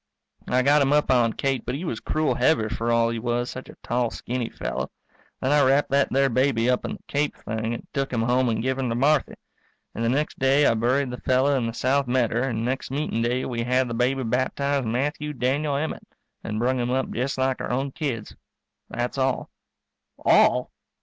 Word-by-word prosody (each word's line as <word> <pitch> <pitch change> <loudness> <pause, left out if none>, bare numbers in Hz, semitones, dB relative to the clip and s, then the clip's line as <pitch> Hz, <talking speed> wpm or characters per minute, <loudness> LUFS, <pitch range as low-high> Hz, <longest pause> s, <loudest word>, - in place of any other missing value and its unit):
I 130 +1 +2
got 145 +2 +4
him 140 0 +2
up 150 -2 +3
on 120 -3 +3
Kate, 135 -2 -1
but - - -3
he 160 +6 -5
was 115 -9 -3
cruel 155 0 0
heavy 115 -9 +2
for 115 +2 -1
all 115 0 +3
he 115 - -3
was 120 +1 -1
such 130 - -8
a - - -11
tall 120 -1 0
skinny 120 0 -4
fellow. - - -4 0.5
Then 130 - 0
I 145 0 +5
wrapped 135 +2 +3
that 140 0 +3
there 135 +1 +3
baby 130 -2 +1
up 125 - -1
in - - -3
the - - -11
cape 145 +1 -1
thing 110 +1 -3
and - - -10
took 140 -2 -1
him 115 -3 0
home 125 +1 +2
and 110 0 -1
give 130 +1 -1
him 130 -2 -1
to 115 - -1
Marthy. 140 +3 +2 0.6
And 115 - -3
the 115 - +2
next 145 +5 -1
day 135 +2 +4
I - - +5
buried 125 +4 +1
the 125 - -7
fellow 130 +2 +2
in 125 -3 0
the 115 - -4
south 135 +2 +1
medder 120 -2 +1
and 115 -4 -1
next 130 +2 -2
meetin' 135 -4 -2
day 125 +2 0
we 120 -2 -3
had 125 +2 +1
the 115 - -4
baby 130 +3 +1
baptized 130 +2 0
Matthew 150 +5 -2
Daniel 140 +3 0
Emmett, 155 +3 -3 0.4
and 110 - -4
brung 125 +3 +1
him 120 0 -1
up 130 +1 -1
just 135 +3 -2
like 130 0 0
our - - -4
own 135 +3 -1
kids. 130 -8 -4 0.5
That's 120 +3 -3
all. 130 -1 0 0.7
_All? - - +4
130 Hz, 215 wpm, -24 LUFS, 120-140 Hz, 0.7 s, I